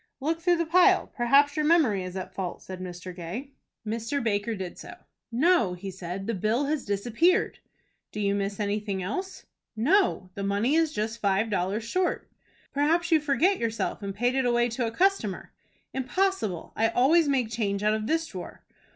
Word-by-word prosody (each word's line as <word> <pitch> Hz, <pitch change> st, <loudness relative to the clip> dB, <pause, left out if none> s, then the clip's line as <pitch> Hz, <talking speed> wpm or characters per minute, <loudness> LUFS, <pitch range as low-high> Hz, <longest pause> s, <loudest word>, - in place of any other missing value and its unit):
"Look 320 Hz, +4 st, -1 dB
through 350 Hz, 0 st, +3 dB
the 335 Hz, -, 0 dB
pile. 355 Hz, +3 st, +4 dB
Perhaps 280 Hz, +4 st, +4 dB
your 305 Hz, -, +1 dB
memory 300 Hz, -, +3 dB
is 185 Hz, 0 st, -7 dB
at 185 Hz, 0 st, -6 dB
fault," 185 Hz, -2 st, -5 dB
said 185 Hz, -1 st, -8 dB
Mr. 180 Hz, 0 st, -7 dB
Gay. 190 Hz, +11 st, -6 dB, 0.3 s
Mr. 230 Hz, +5 st, -2 dB
Baker 220 Hz, 0 st, 0 dB
did 190 Hz, -3 st, -6 dB
so. -, -, -9 dB, 0.4 s
"No," 245 Hz, -, +3 dB
he 190 Hz, +2 st, -7 dB
said, 185 Hz, +1 st, -6 dB
"the 230 Hz, -, -1 dB
bill 220 Hz, +7 st, 0 dB
has 295 Hz, -1 st, -1 dB
disappeared." 235 Hz, -, +1 dB, 0.5 s
"Do 210 Hz, -, -6 dB
you 200 Hz, -1 st, +1 dB
miss 200 Hz, 0 st, -2 dB
anything 205 Hz, -2 st, -2 dB
else?" 370 Hz, -, -5 dB, 0.3 s
"No. 255 Hz, -, +2 dB
The 200 Hz, -, -6 dB
money 200 Hz, +7 st, +1 dB
is 325 Hz, -1 st, +3 dB
just 220 Hz, -1 st, -3 dB
five 200 Hz, +2 st, +1 dB
dollars 195 Hz, +3 st, -1 dB
short." 360 Hz, +10 st, -1 dB, 0.4 s
"Perhaps 325 Hz, +5 st, +1 dB
you 320 Hz, -, +6 dB
forget 300 Hz, +7 st, +2 dB
yourself, 230 Hz, -1 st, -2 dB
and 200 Hz, -1 st, -5 dB
paid 245 Hz, +4 st, +1 dB
it 265 Hz, -1 st, +1 dB
away 240 Hz, 0 st, +2 dB
to 235 Hz, 0 st, -2 dB
a -, -, -3 dB
customer." 355 Hz, -, 0 dB, 0.4 s
"Impossible; 265 Hz, -, -1 dB
I 225 Hz, -, +3 dB
always 300 Hz, +8 st, +4 dB
make 255 Hz, -5 st, +1 dB
change 205 Hz, -3 st, -1 dB
out 210 Hz, 0 st, +3 dB
of 215 Hz, 0 st, -2 dB
this 325 Hz, +3 st, +1 dB
drawer." 185 Hz, -, -9 dB
230 Hz, 180 wpm, -27 LUFS, 200-295 Hz, 0.5 s, you